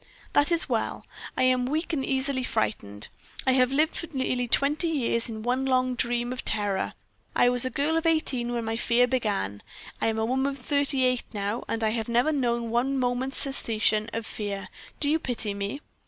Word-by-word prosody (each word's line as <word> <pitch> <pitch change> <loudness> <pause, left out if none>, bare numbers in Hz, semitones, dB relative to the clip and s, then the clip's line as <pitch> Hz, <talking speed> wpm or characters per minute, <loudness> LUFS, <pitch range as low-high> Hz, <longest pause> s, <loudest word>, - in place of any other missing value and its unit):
"That 290 +3 +4
is 335 -1 +1
well. - - -2 0.3
I - - +2
am 255 -1 +3
weak 315 +5 -1
and 275 -4 0
easily 265 -1 0
frightened; 105 - -2 0.4
I 260 - +4
have 255 0 +4
lived 305 +4 +2
for 335 - -4
nearly 255 -3 -1
twenty 290 +7 +2
years 250 -6 0
in 220 -1 -6
one 250 +3 0
long 255 -1 +2
dream 240 0 0
of 255 - -5
terror. 205 -2 +1 0.4
I 245 - +5
was 245 0 +3
a - - 0
girl 290 +5 0
of 325 0 0
eighteen 265 -7 +2
when 235 -1 -2
my 225 0 -1
fear 240 +1 +3
began 205 - -1 0.4
I - - +2
am 220 0 0
a 220 - +1
woman 265 +3 0
of - - -10
thirty 280 0 +2
eight 250 -1 +1
now, 205 +3 -2
and 225 0 -2
I 220 - +3
have 225 +1 -2
never 240 +6 +3
known 235 -5 0
one 260 +4 +1
moment's 250 +1 -1
cessation 220 -5 +1
of 230 0 -3
fear. 200 -4 -4 0.3
Do 290 - 0
you 310 +2 +3
pity 230 -7 -3
me?" 200 +8 -4
250 Hz, 200 wpm, -27 LUFS, 225-270 Hz, 0.4 s, I